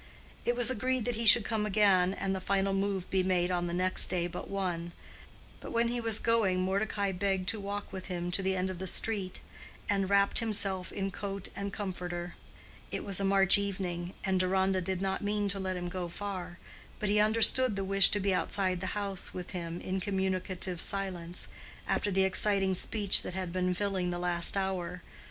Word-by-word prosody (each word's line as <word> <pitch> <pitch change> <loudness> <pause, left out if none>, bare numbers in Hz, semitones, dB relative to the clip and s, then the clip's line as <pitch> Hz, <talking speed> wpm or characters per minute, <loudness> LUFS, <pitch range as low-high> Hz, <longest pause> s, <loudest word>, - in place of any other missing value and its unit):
It 240 - +1
was 245 +1 +5
agreed 255 0 -1
that 245 - 0
he 230 0 +2
should 220 0 +8
come 220 -2 -1
again 195 -3 +3
and 195 - -2
the 190 - -3
final 195 +1 0
move 195 -1 -1
be 190 - +2
made 180 -1 +1
on 175 -1 -1
the - - -4
next 185 +1 +2
day 175 -2 -1
but 175 - -6
one; 175 -3 -3 0.7
but - - -9
when 235 0 +1
he 240 0 -2
was 225 -2 +2
going 220 -6 +2
Mordecai 200 +1 -1
begged 190 0 -1
to 220 - 0
walk 200 +1 -5
with 190 -1 -6
him 175 -1 -3
to 185 - 0
the 190 0 0
end 185 0 -1
of 180 - -8
the 190 - -3
street, 195 -1 +1 0.5
and 195 -2 0
wrapped 200 0 +3
himself 200 -5 0
in 195 0 -3
coat 195 0 -6
and 200 0 -4
comforter. 180 -3 -5 0.6
It - - -4
was 200 -2 +3
a - - -1
March 195 0 +5
evening, 185 -3 -4
and 190 -1 +1
Deronda 190 0 +1
did 190 +1 -3
not 190 0 -1
mean 205 0 0
to 195 0 -4
let 185 -1 -3
him 175 0 -4
go 175 -1 -4
far, 185 -2 -6 0.4
but 210 - -2
he 210 +1 +3
understood 225 +2 +5
the 195 - -2
wish 195 0 +6
to 205 - +1
be 195 -1 +1
outside 185 -1 0
the 185 +2 -3
house 200 -2 -4
with 180 -1 -6
him 170 -1 -5
in 190 +1 -3
communicative 185 -2 -2
silence, 185 -3 -2 0.4
after 205 - 0
the 190 -1 +2
exciting 195 0 +2
speech 200 +2 +3
that 180 - -6
had 185 -2 -4
been 180 0 0
filling 190 -2 -1
the 175 - -3
last 175 +1 -1
hour. 180 -2 -3
190 Hz, 200 wpm, -30 LUFS, 185-200 Hz, 0.7 s, should